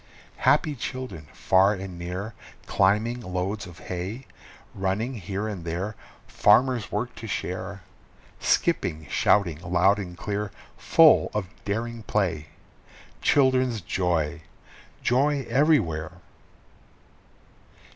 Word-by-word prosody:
Happy 155 Hz, -, +3 dB
children 130 Hz, -, -6 dB
far 95 Hz, +2 st, +3 dB
and 95 Hz, -2 st, -7 dB
near 90 Hz, +5 st, -5 dB, 0.3 s
climbing 105 Hz, +5 st, +2 dB
loads 95 Hz, +1 st, -3 dB
of 85 Hz, -1 st, -12 dB
hay, 95 Hz, +8 st, -5 dB, 0.5 s
Running 100 Hz, +6 st, -1 dB
here 100 Hz, -1 st, -4 dB
and 100 Hz, -5 st, -5 dB
there. 90 Hz, +6 st, -3 dB, 0.3 s
Farmer's 125 Hz, -4 st, +3 dB
work 115 Hz, +4 st, -2 dB
to 115 Hz, -, -8 dB
share, 95 Hz, -1 st, -4 dB, 0.6 s
Skipping, 90 Hz, -, +1 dB
shouting 90 Hz, -7 st, +2 dB
loud 90 Hz, +3 st, +3 dB
and 90 Hz, -3 st, -7 dB
clear, 105 Hz, +2 st, -3 dB, 0.3 s
full -, -, +5 dB
of 100 Hz, -4 st, -2 dB, 0.2 s
daring 115 Hz, +3 st, -3 dB
play 90 Hz, -8 st, -1 dB, 0.7 s
Children's 130 Hz, -4 st, +3 dB
joy! 85 Hz, -3 st, -1 dB, 0.6 s
Joy 135 Hz, +2 st, +2 dB
everywhere! 115 Hz, -, +2 dB
100 Hz, 100 wpm, -26 LUFS, 90-115 Hz, 0.7 s, full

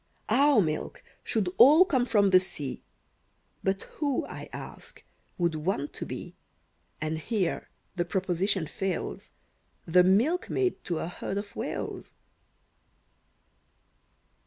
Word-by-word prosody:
Our 280 Hz, -4 st, +5 dB
milk 155 Hz, -3 st, -3 dB, 0.2 s
should 210 Hz, -6 st, 0 dB
all 305 Hz, +8 st, +9 dB
come 260 Hz, -8 st, +1 dB
from 205 Hz, -4 st, +3 dB
the 185 Hz, -, +8 dB
sea, 150 Hz, -7 st, -2 dB, 0.8 s
But 195 Hz, 0 st, 0 dB
who, 285 Hz, -4 st, 0 dB
I -, -, -8 dB
ask, -, -, -8 dB, 0.3 s
would 170 Hz, -2 st, +1 dB
want 155 Hz, -2 st, -2 dB
to -, -, -4 dB
be, -, -, -7 dB, 0.6 s
And 155 Hz, +1 st, -2 dB
here 190 Hz, 0 st, -2 dB, 0.3 s
the 175 Hz, -, +1 dB
proposition 190 Hz, 0 st, 0 dB
fails, 185 Hz, +3 st, -4 dB, 0.6 s
The 180 Hz, +2 st, +5 dB
milkmaid 320 Hz, -, +1 dB
to 170 Hz, -, -1 dB
a 160 Hz, -, -3 dB
herd 185 Hz, +2 st, -5 dB
of 205 Hz, 0 st, -6 dB
Whales? -, -, -5 dB
190 Hz, 115 wpm, -28 LUFS, 170-235 Hz, 0.8 s, all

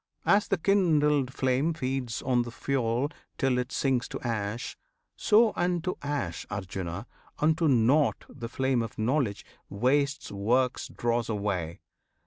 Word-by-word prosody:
As 200 Hz, +1 st, +4 dB
the 195 Hz, -, +1 dB
kindled 150 Hz, -8 st, +3 dB
flame 130 Hz, +5 st, +1 dB
Feeds 130 Hz, -5 st, -3 dB
on 125 Hz, -2 st, +2 dB
the 120 Hz, -, -4 dB
fuel 130 Hz, +1 st, -1 dB, 0.3 s
till 130 Hz, -2 st, +2 dB
it 125 Hz, +2 st, -3 dB
sinks 130 Hz, -3 st, 0 dB
to -, -, -6 dB
ash, 115 Hz, -1 st, -3 dB, 0.4 s
So 220 Hz, +1 st, +4 dB
unto 175 Hz, 0 st, 0 dB
ash, 140 Hz, -, -3 dB
Arjuna! 95 Hz, -1 st, -4 dB, 0.3 s
unto 160 Hz, +2 st, +2 dB
nought 135 Hz, +3 st, +3 dB
The 120 Hz, -4 st, -8 dB
flame 130 Hz, -1 st, +1 dB
of 115 Hz, -, -6 dB
Knowledge 115 Hz, -2 st, 0 dB, 0.2 s
wastes 140 Hz, +6 st, 0 dB
works' 120 Hz, +6 st, +1 dB
dross 120 Hz, -1 st, -1 dB
away! 100 Hz, -6 st, -2 dB
130 Hz, 130 wpm, -28 LUFS, 115-145 Hz, 0.4 s, As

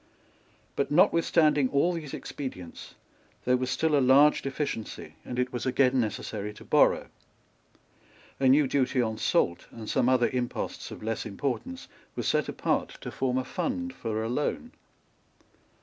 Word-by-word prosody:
But, 140 Hz, -, 0 dB
notwithstanding 155 Hz, -3 st, +4 dB
all 145 Hz, +7 st, +2 dB
these 155 Hz, -5 st, -6 dB
expedients, 90 Hz, -, -8 dB, 0.5 s
there 125 Hz, -, +4 dB
was 130 Hz, 0 st, -1 dB
still 160 Hz, +2 st, +1 dB
a 140 Hz, -, +4 dB
large 140 Hz, +4 st, +5 dB
deficiency; 135 Hz, -5 st, -4 dB
and 125 Hz, -, -6 dB
it 125 Hz, 0 st, -1 dB
was 120 Hz, +1 st, -3 dB
again 130 Hz, 0 st, +3 dB
necessary 105 Hz, -2 st, -3 dB
to -, -, -13 dB
borrow. -, -, +3 dB, 1.3 s
A 135 Hz, -, +3 dB
new 140 Hz, +3 st, +5 dB
duty 130 Hz, -1 st, +1 dB
on 110 Hz, -2 st, 0 dB
salt 85 Hz, +1 st, +1 dB
and 110 Hz, -2 st, -10 dB
some 125 Hz, -, +2 dB
other 125 Hz, -2 st, +4 dB
imposts 125 Hz, -1 st, -3 dB
of -, -, -9 dB
less 110 Hz, 0 st, -2 dB
importance 110 Hz, -3 st, -4 dB, 0.3 s
were -, -, -3 dB
set -, -, +1 dB
apart -, -, -1 dB
to -, -, -6 dB
form 130 Hz, -1 st, -1 dB
a 130 Hz, -, -1 dB
fund 265 Hz, -1 st, -3 dB
for 110 Hz, -1 st, -3 dB
a -, -, -2 dB
loan. 150 Hz, -, -2 dB
130 Hz, 150 wpm, -28 LUFS, 115-145 Hz, 1.3 s, large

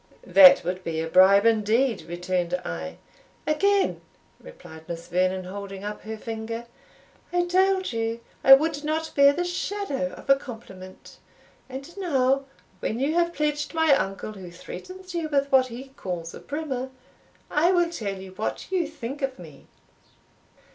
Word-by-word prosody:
"That 185 Hz, -2 st, +8 dB
would 180 Hz, +2 st, -3 dB
be 165 Hz, -2 st, -3 dB
a 165 Hz, -, -2 dB
bribe 190 Hz, +4 st, +6 dB
indeed," 230 Hz, +2 st, +2 dB
returned 175 Hz, 0 st, -1 dB
I. 80 Hz, -2 st, -5 dB, 0.5 s
"Again!" 395 Hz, +6 st, +2 dB, 0.4 s
replied 160 Hz, -, -13 dB
Miss 170 Hz, 0 st, -6 dB
Vernon, 185 Hz, +1 st, 0 dB
holding 195 Hz, +1 st, -7 dB
up 210 Hz, 0 st, -5 dB
her 220 Hz, +1 st, -6 dB
finger; 225 Hz, +1 st, -5 dB, 0.7 s
"I 350 Hz, 0 st, +1 dB
told 375 Hz, -2 st, +2 dB
you 225 Hz, 0 st, -2 dB, 0.2 s
I 270 Hz, -, +11 dB
would 300 Hz, +1 st, -1 dB
not 315 Hz, +1 st, -2 dB
bear 280 Hz, 0 st, +6 dB
the 345 Hz, +5 st, -2 dB
shadow 350 Hz, -6 st, -3 dB
of -, -, -12 dB
a 275 Hz, -, +7 dB
compliment. 195 Hz, -8 st, -11 dB, 0.5 s
And 275 Hz, +6 st, -8 dB
now, 275 Hz, -6 st, +1 dB, 0.3 s
when 225 Hz, -, -2 dB
you 280 Hz, +4 st, +1 dB
have 340 Hz, 0 st, +2 dB
pledged 295 Hz, -1 st, -2 dB
my 320 Hz, -2 st, +4 dB
uncle, 195 Hz, -3 st, -3 dB
who 190 Hz, -3 st, -10 dB
threatens 370 Hz, -, -10 dB
you 330 Hz, -2 st, -2 dB
with 280 Hz, -1 st, 0 dB
what 260 Hz, -1 st, +5 dB
he 255 Hz, +3 st, -9 dB
calls 175 Hz, -9 st, -6 dB
a -, -, -9 dB
brimmer, 280 Hz, -4 st, -4 dB, 0.6 s
I 330 Hz, +5 st, +3 dB
will 350 Hz, -2 st, +2 dB
tell 200 Hz, -, -4 dB
you 190 Hz, 0 st, -10 dB
what 215 Hz, -, -5 dB
you 360 Hz, -4 st, +1 dB
think 280 Hz, -2 st, -7 dB
of 270 Hz, -1 st, -2 dB
me." 155 Hz, -6 st, -13 dB
255 Hz, 155 wpm, -25 LUFS, 190-310 Hz, 0.7 s, I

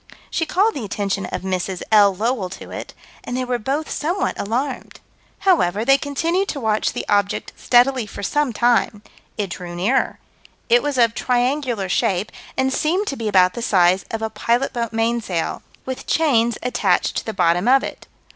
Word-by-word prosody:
She 325 Hz, -, -1 dB
called 415 Hz, +5 st, +2 dB
the 270 Hz, -, -5 dB
attention 200 Hz, -2 st, -2 dB
of -, -, -5 dB
Mrs. 185 Hz, -1 st, -2 dB
L. 205 Hz, -3 st, +6 dB
Lowell 220 Hz, -1 st, -1 dB
to 190 Hz, -, -10 dB
it, -, -, -7 dB, 0.3 s
and 245 Hz, -, -4 dB
they 255 Hz, -, -1 dB
were 245 Hz, -1 st, -1 dB
both 280 Hz, +7 st, -2 dB
somewhat 345 Hz, +6 st, -1 dB
alarmed. 250 Hz, +7 st, -3 dB, 0.4 s
However, 225 Hz, -, +2 dB
they 275 Hz, +1 st, +5 dB
continued 335 Hz, +7 st, -1 dB
to 285 Hz, -, -3 dB
watch 220 Hz, -3 st, 0 dB
the -, -, -4 dB
object 205 Hz, -1 st, 0 dB
steadily 245 Hz, -1 st, +3 dB
for 200 Hz, -, -8 dB
some 295 Hz, +5 st, 0 dB
time. 230 Hz, -2 st, +1 dB, 0.3 s
It 200 Hz, -4 st, -2 dB
drew 175 Hz, -1 st, -6 dB
nearer. 205 Hz, +10 st, +1 dB, 0.5 s
It 240 Hz, +1 st, +5 dB
was 290 Hz, -2 st, -2 dB
of 230 Hz, -2 st, +4 dB
triangular 245 Hz, -3 st, 0 dB
shape, 185 Hz, +2 st, 0 dB, 0.3 s
and 265 Hz, 0 st, +1 dB
seemed 360 Hz, +9 st, +1 dB
to 275 Hz, -, -3 dB
be 230 Hz, -4 st, -4 dB
about 185 Hz, -3 st, +4 dB
the 235 Hz, -, -5 dB
size 185 Hz, -4 st, +3 dB
of 225 Hz, 0 st, -4 dB
a 220 Hz, -, -2 dB
pilot 235 Hz, +5 st, 0 dB
boat 235 Hz, -2 st, -2 dB
mainsail, 225 Hz, -6 st, -1 dB, 0.2 s
with 260 Hz, -1 st, -6 dB
chains 235 Hz, -8 st, +2 dB
attached 200 Hz, -7 st, +1 dB
to -, -, -2 dB
the -, -, -1 dB
bottom 180 Hz, 0 st, +1 dB
of 265 Hz, +2 st, +5 dB
it. -, -, -7 dB
235 Hz, 180 wpm, -21 LUFS, 200-265 Hz, 0.5 s, L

